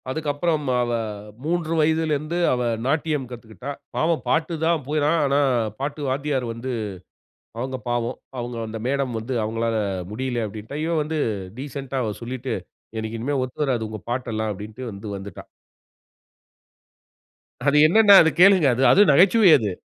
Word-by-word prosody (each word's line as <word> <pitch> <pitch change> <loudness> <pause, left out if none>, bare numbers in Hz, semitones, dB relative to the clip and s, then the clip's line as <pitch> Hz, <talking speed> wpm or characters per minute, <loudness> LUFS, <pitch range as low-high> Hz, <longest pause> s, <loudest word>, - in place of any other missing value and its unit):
அதுக்கப்புறம் 150 +2 -1 0.2
அவ, 120 0 -1 0.5
3 165 0 -1
வயதுல 160 0 +2
இருந்து 155 +4 -3 0.2
அவ, 125 - -1 0.2
நாட்டியம் 150 -1 0
கத்துக்கிட்டா. 120 +3 -8 0.2
பாவம் 165 0 +1
பாட்டு 165 +2 +1
தான் 165 -3 +1
போனா 150 0 +1
ஆனா, 140 +1 +2 0.4
பாட்டு 145 +2 -4
வாத்தியார் 135 -1 -1
வந்து, 120 +3 -5 0.9
அவங்க 130 +2 -3
பாவம். 120 +1 -1 0.2
அவங்க 120 0 -4
அந்த 110 0 -6
மேடம் 135 -2 -1
வந்து 115 +4 -4
அவங்களால 115 +1 -1 0.4
முடியல 120 0 -2
அப்படின்ட்டா. 110 +7 -7
இவ 165 - -1
வந்து 155 +1 -3 0.4
டிசென்டா 135 -1 -5
அவ 110 - -2
சொல்லிட்டு, 130 +2 -4 0.4
"எனக்கு 110 +1 -4
இனிமே 140 +5 -1
ஒத்து 130 +3 -5
வராது 120 -5 -1
உங்க 110 -1 -7
பாட்டெல்லாம்" 110 -3 -2
அப்படின்டு 105 +5 -9
வந்து 100 +2 -8
வந்துட்டா. 100 +1 -9 2.2
அது 145 +1 +4
என்னென்னா 205 +3 +7
அது 160 - +2
கேளுங்க. 185 -5 +7
அது 130 - 0
அது 200 - +6
நகைச்சுவை 185 +5 +6
அது. 105 -4 -2
135 Hz, 140 wpm, -23 LUFS, 115-155 Hz, 2.2 s, என்னென்னா